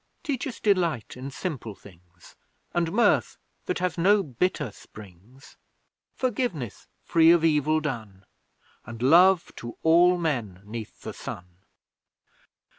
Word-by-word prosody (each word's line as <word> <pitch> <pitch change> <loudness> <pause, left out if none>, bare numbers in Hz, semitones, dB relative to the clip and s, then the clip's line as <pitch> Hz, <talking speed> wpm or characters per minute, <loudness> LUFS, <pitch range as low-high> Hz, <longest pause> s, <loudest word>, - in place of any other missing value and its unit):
Teach 285 -4 -2
us 255 - -7
Delight 175 - 0
in 130 +2 -7
simple 135 - -5
things, 90 -2 -18 0.4
And 170 -1 0
Mirth 235 +5 +2 0.3
that 180 - -1
has 180 -1 -2
no 200 +3 +4
bitter 145 - -2
springs; 105 +7 -16 0.6
Forgiveness 215 - -3 0.2
free 165 -1 +4
of 170 -1 +5
evil 155 0 +2
done, 110 -10 -6 0.6
And 115 +1 -8
Love 175 +6 +5
to 120 0 -8
all 175 +2 +5
men 120 - -3
'neath 110 0 -8
the - - -7
sun! 90 - -7
150 Hz, 120 wpm, -26 LUFS, 110-180 Hz, 0.6 s, of